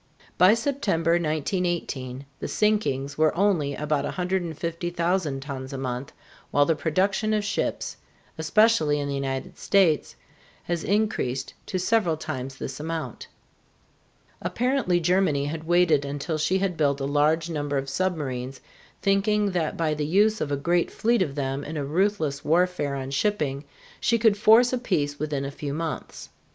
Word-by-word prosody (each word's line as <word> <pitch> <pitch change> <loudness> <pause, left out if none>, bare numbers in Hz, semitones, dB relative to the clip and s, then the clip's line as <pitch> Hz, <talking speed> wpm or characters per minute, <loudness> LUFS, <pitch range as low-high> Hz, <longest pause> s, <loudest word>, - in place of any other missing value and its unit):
By 185 +4 +6
September, 230 - 0
1918, 155 -5 -1
the - - -4
sinkings 150 -10 0
were 155 +1 +3
only 175 -8 +2
about 150 -1 -1
150,000 175 -3 -2
tons 135 -1 -6
a - - -3
month, 130 0 -4 0.4
while 145 - +3
the 165 - +2
production 195 +7 +1
of 210 - 0
ships, 210 +1 -2 0.4
especially 160 -2 +3
in 145 - -2
the 140 - -2
United 135 -1 -4
States, 185 -7 +2 0.5
has 170 -1 -2
increased 185 - 0
to 185 - -2
several 185 -4 +1
times 135 -3 -5
this 135 0 -6
amount. 160 +1 -5 1.1
Apparently 245 -8 +1
Germany 175 -5 +2
had 155 +2 -4
waited 170 -4 +3
until 145 +3 -3
she 180 +5 +2
had 190 -2 -1
built 145 -2 +1
a 135 - -2
large 150 +3 +2
number 145 -2 -2
of 135 0 -2
submarines, 135 -5 -2 0.4
thinking 205 +1 +2
that 170 -4 -1
by 160 -2 +1
the 150 -1 -2
use 210 +6 +3
of 145 - -2
a 140 - +1
great 170 +4 +1
fleet 235 -1 +1
of 145 -7 -1
them 135 0 -2
in 155 +2 -5
a 145 - -2
ruthless 155 -3 0
warfare 170 -3 +1
on 135 0 -5
shipping 145 -4 -1 0.3
she 235 - +2
could 220 -2 +4
force 225 +4 +5
a 255 - +1
peace 145 -11 -1
within 145 -2 -2
a 140 - -4
few 145 0 -5
months. 160 -1 -5
160 Hz, 155 wpm, -25 LUFS, 140-190 Hz, 1.1 s, By